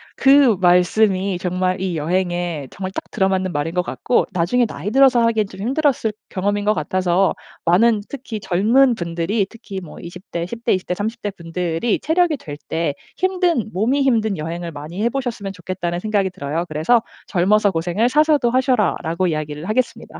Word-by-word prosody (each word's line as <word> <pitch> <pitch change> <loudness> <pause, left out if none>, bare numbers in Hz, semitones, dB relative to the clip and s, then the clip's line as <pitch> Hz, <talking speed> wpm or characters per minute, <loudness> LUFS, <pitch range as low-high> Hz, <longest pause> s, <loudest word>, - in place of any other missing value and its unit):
그 270 -4 +5
말씀이 185 +1 +3
정말 185 +1 -1
이 185 -3 -2
여행에 175 -2 -1
정말 190 0 -5
딱 - - -6
들어 190 - +1
맞는 190 -1 -1
말인 150 +3 -2
것 180 - +2
같고 210 +6 0
나중에 190 +8 +2
나이 210 - -5
들어서 265 -1 +5
하기엔 220 -3 +2
좀 190 0 -11
힘들었을 260 -3 +1 0.2
경험인 205 +1 -1
것 215 - +3
같아서 180 +3 +1 0.3
많은 210 +6 +4
특히 245 -5 -6
젊은 230 +8 +3
분들이 175 +2 -1
특히 200 -4 -8
뭐 170 - -11
20 180 +2 -10
대 170 0 -2
10 230 +6 -8
대, 235 - +3
20 185 - -2
대, - - 0
30 220 +5 -4
대 205 - -1
분들이 170 +3 -2
체력이 325 -1 +1
될 145 -9 -8
때 165 -3 -1 0.2
힘든 360 - 0
몸이 240 +9 +1
힘든 220 -7 +1
여행을 170 +2 -5
많이 155 +7 -7
해보셨으면 235 -5 -2
좋겠다는 175 -1 -4
생각이 205 -2 0
들어요. 155 +1 -3
그래서 160 +10 +2 0.3
"젊어서 200 +3 +3
고생을 180 +7 0
사서도 300 -3 +3
하셔라."라고 225 -9 +1
이야기를 155 0 -3
하겠습니다. 245 +3 -2
195 Hz, 360 characters per minute, -20 LUFS, 175-230 Hz, 0.3 s, 그